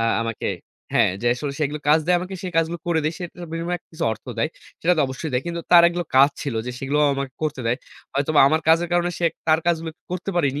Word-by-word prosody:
আ - - +1 0.2
আমাকে। 115 -1 -3 0.5
হ্যাঁ, - - +4
যে - - -1
আসলে 140 +2 -4
সেগুলো 150 0 -1
কাজ 155 +2 +6
দেয় 180 0 +4
আমাকে, 185 +2 -6
সে 185 - -3
কাজগুলো 165 +1 +1
করে 170 -2 +2
দেই। 155 - +1
সে 180 - -4
তার 175 -1 -8
বিনিময়ে 170 +1 -2
কিছু 160 0 -4
অর্থ 110 - -10
দেয়। 115 - +1 0.3
সেটা 175 - +3
তো - - +2
অবশ্যই 130 +4 -5
দেয়। 125 +1 +1
কিন্তু 170 0 -3
তার 175 -1 +9
একগুলো 175 0 -3
কাজ 140 +2 +7
ছিল 140 -4 -3
যে, - - -2
সেগুলোও 145 +3 +1
আমাকে 135 -1 -4
করতে 150 -3 -2
দেয়। 115 +2 +2 0.4
হয়তোবা 145 +2 +3
আমার 155 +2 +2
কাজের 165 +2 +4
কারণে 175 0 +2
সে 175 - -1 0.2
তার 160 0 +5
কাজগুলো 165 -1 0 0.2
করতে 180 +2 -3
পারিনি। 145 -4 +1
160 Hz, 240 wpm, -23 LUFS, 140-175 Hz, 0.5 s, তার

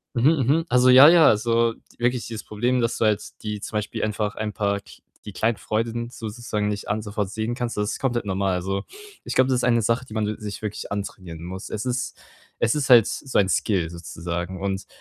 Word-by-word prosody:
Mhm, 125 +6 +5
mhm. 160 +5 +2
Also, 125 0 +4
ja, 130 +3 +10
ja, 165 -2 +7
also, 115 +1 +3 0.2
wirklich 120 0 0
dieses 110 -2 -6
Problem, 120 +4 0
dass 115 - 0
du 110 - +1
halt 105 -1 +2 0.2
die 105 -1 -4
zum 105 - -4
Beispiel 105 - -3
einfach 105 -1 -1
ein 110 -1 -3
paar 100 -1 0
kl - - -16 0.2
die 105 - -9
kleinen 110 +3 0
Freuden 115 +2 -2
sozusagen 110 -2 -4
nicht 105 -1 -3
alle 105 +1 -1
sofort 105 -2 -3
sehen 110 +3 -3
kannst, 120 -3 -4
das 105 0 0
ist - - -5
komplett 120 -4 -1
normal. 95 -1 0
Also, 95 +2 -2 0.4
ich - - -5
glaube, 130 0 +4
das 130 - +2
ist - - -1
eine 120 -2 +3
Sache, 115 +3 +1
die 110 - -12
man 110 -1 0
s 105 - -4
sich 105 -1 -6
wirklich 105 -1 -5
antrainieren 95 -5 -6
muss. 95 +3 -7
Es 110 +3 -4
ist 125 0 -2 0.4
es 115 - +2
ist 145 -3 -1
halt 120 -4 +8
so 135 - -3
ein 100 - +4
Skill 95 -4 0
sozusagen. 85 +1 -5
Und 95 -1 -3
110 Hz, 225 wpm, -24 LUFS, 100-120 Hz, 0.4 s, ja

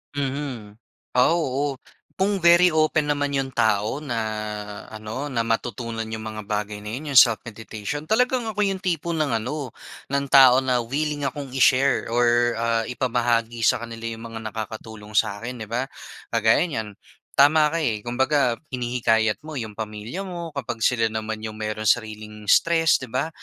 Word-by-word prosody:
Mhm. 135 -7 -4 0.4
Ah, 125 +6 +5
oo. 140 -3 -1 0.4
Kung 195 +1 +1
very 175 +1 +6
open 155 -1 +2
naman 145 0 -1
'yon 135 -2 -2
tao 110 +3 +1
na 130 -6 -3 0.7
ano, 110 +6 -6
na 120 -4 0
matutunan 115 0 -2
'yong 110 0 -5
mga 105 0 -6
bagay 105 0 -2
na 105 - -7
'yon, 145 +2 -6
'yong 130 - +9
self-meditation. 115 +4 -2
Talagang 250 +1 +2
ako 210 0 0
'yong 195 -1 -2
tipo 170 -2 -1
ng 150 -7 0
ano, 130 +4 -4 0.4
ng 140 0 0
tao 130 -2 +8
na 125 -2 +1
willing 145 +4 -2
akong 135 0 -6
i-share 135 0 +3
or 120 0 +3
ah, 115 0 +1
ipamahagi 120 -2 0
sa 115 - +2
kanila 115 0 -7
'yong 115 0 -6
mga 110 - -5
nakakatulong 110 -1 -8
sa'kin, 115 +4 -1
'di 110 - -6
ba. 125 +3 -1 0.5
Kagaya 110 +3 +4
niyan 125 -11 -4 0.5
tama 150 +2 +6
ka, 165 - -2
eh. 115 -10 -1
Kumbaga, 125 +1 +1 0.2
hinihikayat 120 -1 +1
mo 155 - -7
'yong 110 -7 -5
pamilya 110 - -5
mo 175 -3 -6
kapag 120 -4 -4
sila 115 -1 +3
naman 110 0 -3
'yong 110 - -5
merong 110 0 -4
sariling 105 -2 -1
stress, 165 -1 +4
'di 130 -3 -10
ba 135 +5 0
120 Hz, 160 wpm, -24 LUFS, 110-145 Hz, 0.7 s, yong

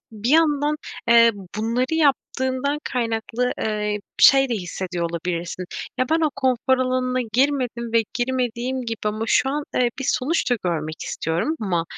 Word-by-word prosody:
bir 220 +3 -2
yandan, 300 -1 +3 0.3
eee, 235 0 +7 0.3
bunları 235 +6 0
yaptığından 280 -2 0
kaynaklı, 235 0 -1
eee, 210 -1 -1 0.2
şey 270 0 +7
de 240 - 0
hissediyor 180 -3 -3
olabilirsin. 170 +1 -3 0.3
Ya, 255 - +1
ben 325 +1 +3
o - - -1
konfor 260 -1 +2
alanına 255 0 0
girmedim 250 -3 0
ve 230 -1 +4
girmediğim 255 0 -1
gibi 225 -1 -3
ama 215 +1 -1
şu 265 - +3
an, 295 +2 -2
eee, 245 -1 +2
bir 270 - -3
sonuç 265 +3 0
da 245 - +3
görmek 155 -3 -2
istiyorum. 165 - -1
Ama, 175 -6 0
245 Hz, 150 wpm, -22 LUFS, 215-265 Hz, 0.3 s, eee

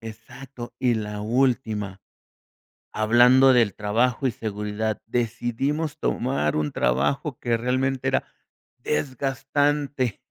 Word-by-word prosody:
Exacto 120 +2 -10
y 125 -2 +2
la 105 -1 -4
última, 110 -5 0 0.9
hablando 120 +5 +5
del 115 -5 +3
trabajo 115 +5 0
y 130 - +2
seguridad, 105 0 -3
decidimos 120 +7 -2
tomar 120 - 0
un 75 -1 -1
trabajo 120 - 0
que 120 -2 0
realmente 130 +2 -1
era - - +1 0.6
desgastante, 135 -1 -1
120 Hz, 100 wpm, -24 LUFS, 110-135 Hz, 0.9 s, hablando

